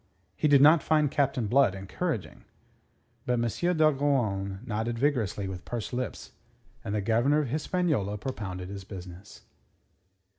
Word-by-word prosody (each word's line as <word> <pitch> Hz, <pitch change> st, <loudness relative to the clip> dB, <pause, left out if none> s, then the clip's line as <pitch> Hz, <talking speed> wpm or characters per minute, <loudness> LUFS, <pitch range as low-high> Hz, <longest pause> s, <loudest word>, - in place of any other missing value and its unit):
He -, -, +1 dB
did 140 Hz, -2 st, +6 dB
not 155 Hz, +1 st, +7 dB
find 150 Hz, -2 st, +2 dB
Captain 140 Hz, -5 st, +1 dB
Blood 120 Hz, -3 st, +3 dB
encouraging. 95 Hz, -1 st, -4 dB, 0.8 s
But 125 Hz, -, +2 dB
M. 120 Hz, -, +1 dB
d'Ogeron 130 Hz, -, +1 dB
nodded 115 Hz, 0 st, -2 dB
vigorously 115 Hz, -7 st, 0 dB
with 95 Hz, -2 st, -6 dB
pursed 120 Hz, 0 st, -5 dB
lips, 125 Hz, -4 st, -4 dB, 0.5 s
and 100 Hz, -, -3 dB
the 105 Hz, -, 0 dB
Governor 120 Hz, +9 st, +2 dB
of 140 Hz, -, -4 dB
Hispaniola 150 Hz, -, -1 dB
propounded 100 Hz, -6 st, -5 dB
his 100 Hz, -1 st, -7 dB
business. 95 Hz, 0 st, -11 dB
120 Hz, 135 wpm, -28 LUFS, 100-145 Hz, 0.8 s, not